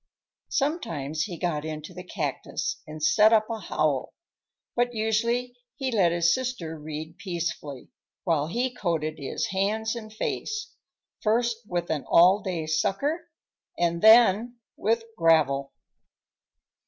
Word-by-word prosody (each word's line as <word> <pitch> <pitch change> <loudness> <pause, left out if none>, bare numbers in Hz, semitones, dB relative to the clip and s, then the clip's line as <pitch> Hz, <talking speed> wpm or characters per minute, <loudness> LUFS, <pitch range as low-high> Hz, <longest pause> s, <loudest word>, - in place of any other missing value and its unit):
Sometimes 160 - -1
he 180 -5 -6
got 160 -4 -1
into 155 +2 -6
the 180 +1 -8
cactus 155 -7 -3
and 155 0 -8
set 210 +6 +5
up 215 -1 +4
a 225 - -3
howl, 155 -7 -1 0.6
but 245 0 +1
usually 235 +3 0 0.2
he 265 -1 -2
let 190 -7 +3
his 170 0 +3
sister 235 -12 -3
read 155 +2 -7
peacefully, 170 -7 -4 0.3
while 155 -5 +1
he 245 +8 -1
coated 160 -8 -2
his 140 - -2
hands 215 +4 0
and 215 -2 -8
face, 430 - -4 0.5
first 235 +1 +1
with 175 -3 -2
an 150 -3 -1
all 185 +4 +6
day 175 -5 -3
sucker 285 - -1 0.5
and 170 -1 0
then 225 +1 +6 0.2
with 225 +2 +1
gravel. 150 -5 +3
185 Hz, 130 wpm, -26 LUFS, 160-230 Hz, 0.6 s, all